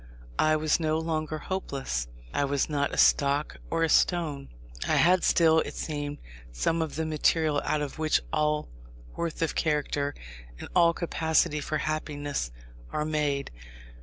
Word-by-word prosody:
I 155 Hz, 0 st, +4 dB
was 155 Hz, +1 st, +2 dB
no 155 Hz, -1 st, +1 dB
longer 155 Hz, -1 st, -2 dB
hopeless: 140 Hz, -, -3 dB, 0.3 s
I -, -, +1 dB
was 140 Hz, 0 st, 0 dB
not 145 Hz, -2 st, 0 dB
a -, -, -5 dB
stock 140 Hz, +1 st, +3 dB
or 165 Hz, 0 st, +1 dB
a -, -, +3 dB
stone. 155 Hz, -5 st, +2 dB, 0.4 s
I -, -, +2 dB
had 180 Hz, +2 st, +4 dB
still, 160 Hz, -1 st, +5 dB
it -, -, -3 dB
seemed, 145 Hz, -1 st, -4 dB, 0.3 s
some 110 Hz, -, 0 dB
of 160 Hz, -3 st, -3 dB
the 160 Hz, -, -1 dB
material 155 Hz, -1 st, +2 dB
out 150 Hz, -, 0 dB
of 145 Hz, +1 st, -6 dB
which 155 Hz, -1 st, +3 dB
all 150 Hz, 0 st, +1 dB, 0.5 s
worth 165 Hz, -1 st, -2 dB
of 165 Hz, -, 0 dB
character, 145 Hz, -2 st, 0 dB, 0.4 s
and -, -, -8 dB
all 170 Hz, -1 st, +5 dB
capacity 160 Hz, -3 st, +1 dB
for 155 Hz, +1 st, -2 dB
happiness, 145 Hz, -, -3 dB, 0.4 s
are 150 Hz, -, -1 dB
made. 150 Hz, -3 st, -1 dB
155 Hz, 155 wpm, -28 LUFS, 145-160 Hz, 0.5 s, still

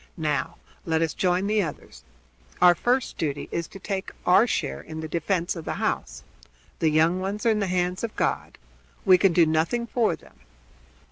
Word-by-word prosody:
Now 150 Hz, -5 st, -1 dB, 0.3 s
let 160 Hz, -1 st, +1 dB
us 160 Hz, -, -1 dB
join 180 Hz, +1 st, +1 dB
the 210 Hz, +1 st, +2 dB
others. 150 Hz, -, -7 dB, 0.6 s
Our 180 Hz, -1 st, +7 dB
first 245 Hz, +8 st, -1 dB
duty 145 Hz, -3 st, -2 dB
is 170 Hz, -1 st, -2 dB
to -, -, -11 dB
take 195 Hz, 0 st, -4 dB, 0.2 s
our 195 Hz, +6 st, +5 dB
share 70 Hz, -, -2 dB
in 155 Hz, -, -8 dB
the 160 Hz, -, -5 dB
defense 170 Hz, +3 st, -1 dB
of 165 Hz, -, -6 dB
the -, -, -3 dB
house. -, -, -3 dB, 0.6 s
The 160 Hz, -, +3 dB
young 160 Hz, +4 st, +3 dB
ones 200 Hz, +4 st, -4 dB
are 230 Hz, -, +5 dB
in 215 Hz, -, +1 dB
the 200 Hz, -, 0 dB
hands 180 Hz, +1 st, -1 dB
of 230 Hz, -, -4 dB
God. -, -, -2 dB, 0.5 s
We 185 Hz, -2 st, +6 dB
can 195 Hz, -1 st, +4 dB
do 170 Hz, 0 st, +5 dB
nothing 160 Hz, +10 st, 0 dB
for 235 Hz, -1 st, +1 dB
them." -, -, -21 dB
180 Hz, 190 wpm, -25 LUFS, 160-195 Hz, 0.6 s, Our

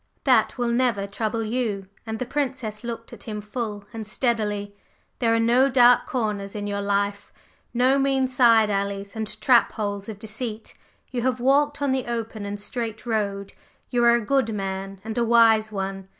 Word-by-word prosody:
"That -, -, +3 dB
will 240 Hz, -1 st, 0 dB
never 235 Hz, -5 st, +1 dB
trouble 215 Hz, +3 st, -2 dB
you!" 215 Hz, -4 st, -2 dB, 0.2 s
and 220 Hz, 0 st, -3 dB
the 255 Hz, -, -3 dB
Princess 250 Hz, -6 st, -3 dB
looked 230 Hz, -1 st, -6 dB
at -, -, -10 dB
him 215 Hz, -2 st, -4 dB
full 210 Hz, -1 st, -5 dB
and 225 Hz, -1 st, -5 dB
steadily. 210 Hz, -3 st, -1 dB, 0.4 s
"There 230 Hz, -2 st, +2 dB
are -, -, +2 dB
no 245 Hz, +4 st, +4 dB
dark 245 Hz, -1 st, +5 dB
corners 210 Hz, -5 st, -2 dB
in 205 Hz, -1 st, -4 dB
your 200 Hz, 0 st, -2 dB
life 200 Hz, 0 st, -1 dB, 0.4 s
no 255 Hz, +3 st, +3 dB
mean 270 Hz, -1 st, +2 dB
side 230 Hz, -4 st, +4 dB
alleys 200 Hz, 0 st, -3 dB
and 215 Hz, -1 st, -2 dB
trap 240 Hz, +2 st, +4 dB
holes 205 Hz, -1 st, -3 dB
of 215 Hz, -, -6 dB
deceit; 220 Hz, +1 st, -5 dB, 0.4 s
you 245 Hz, -, -2 dB
have 255 Hz, 0 st, 0 dB
walked 285 Hz, +3 st, +2 dB
on 280 Hz, -, +1 dB
the 260 Hz, -2 st, -1 dB
open 225 Hz, -3 st, -4 dB
and 205 Hz, 0 st, -5 dB
straight 225 Hz, +1 st, -4 dB
road. 200 Hz, -4 st, -2 dB, 0.4 s
You 240 Hz, -1 st, +2 dB
are 235 Hz, 0 st, +6 dB
a 235 Hz, -2 st, -1 dB
good 255 Hz, -3 st, +1 dB
man 195 Hz, 0 st, -4 dB
and 220 Hz, 0 st, -4 dB
a -, -, +3 dB
wise 225 Hz, -2 st, +4 dB
one. 195 Hz, -1 st, -4 dB
220 Hz, 180 wpm, -24 LUFS, 205-245 Hz, 0.4 s, are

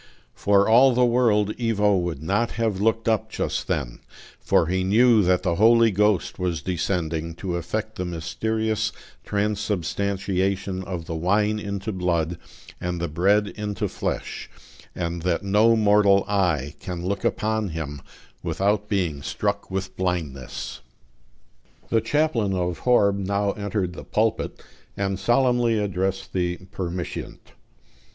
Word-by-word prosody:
For 100 Hz, 0 st, +3 dB
all 125 Hz, +3 st, +6 dB
the 125 Hz, 0 st, +4 dB
world 110 Hz, -4 st, +2 dB
Ivo 105 Hz, -3 st, +2 dB
would 85 Hz, -5 st, -2 dB
not 105 Hz, +7 st, 0 dB
have 110 Hz, -4 st, -1 dB
looked 115 Hz, +1 st, +1 dB
up 110 Hz, -2 st, +1 dB
just -, -, -3 dB
then; -, -, -2 dB, 0.4 s
for -, -, +2 dB
he 95 Hz, +3 st, 0 dB
knew 110 Hz, +4 st, +5 dB
that 90 Hz, -1 st, +2 dB
the 85 Hz, -3 st, 0 dB
Holy 115 Hz, +1 st, +5 dB
Ghost 105 Hz, -2 st, +1 dB
was 90 Hz, -3 st, -2 dB
descending, 85 Hz, -2 st, -2 dB
to 90 Hz, 0 st, -4 dB
effect 110 Hz, +6 st, -3 dB
the 90 Hz, -, -2 dB
mysterious 110 Hz, +6 st, -1 dB, 0.3 s
transubstantiation 100 Hz, -1 st, -1 dB
of 90 Hz, -3 st, -5 dB
the 85 Hz, -, -5 dB
wine 105 Hz, +6 st, +1 dB
into 100 Hz, 0 st, -4 dB
blood 85 Hz, -3 st, -1 dB, 0.4 s
and 90 Hz, 0 st, -3 dB
the 85 Hz, -, -1 dB
bread 100 Hz, +6 st, +2 dB
into 105 Hz, -3 st, -3 dB
flesh, -, -, -4 dB, 0.5 s
and 85 Hz, -1 st, -3 dB
that 90 Hz, +2 st, 0 dB
no 105 Hz, +4 st, +4 dB
mortal 105 Hz, -2 st, +4 dB
eye 85 Hz, -9 st, 0 dB
can 90 Hz, -1 st, -5 dB
look 100 Hz, +1 st, -2 dB
upon 110 Hz, -1 st, 0 dB
Him 75 Hz, -4 st, -5 dB, 0.4 s
without 100 Hz, +5 st, 0 dB
being 85 Hz, -8 st, -1 dB
struck 70 Hz, -, -2 dB
with 95 Hz, 0 st, -4 dB
blindness. 80 Hz, -8 st, -3 dB, 1.1 s
The 115 Hz, -, +2 dB
chaplain 115 Hz, -6 st, +1 dB
of 90 Hz, -2 st, -2 dB
Horb 100 Hz, -5 st, +3 dB
now 100 Hz, +1 st, 0 dB
entered 100 Hz, -3 st, -2 dB
the -, -, -8 dB
pulpit, 110 Hz, +1 st, -1 dB, 0.3 s
and 95 Hz, -1 st, -1 dB
solemnly 120 Hz, +1 st, +2 dB
addressed 95 Hz, -1 st, -2 dB
the 90 Hz, -1 st, 0 dB
"permitiant." 90 Hz, -1 st, -5 dB
100 Hz, 135 wpm, -24 LUFS, 90-105 Hz, 1.1 s, all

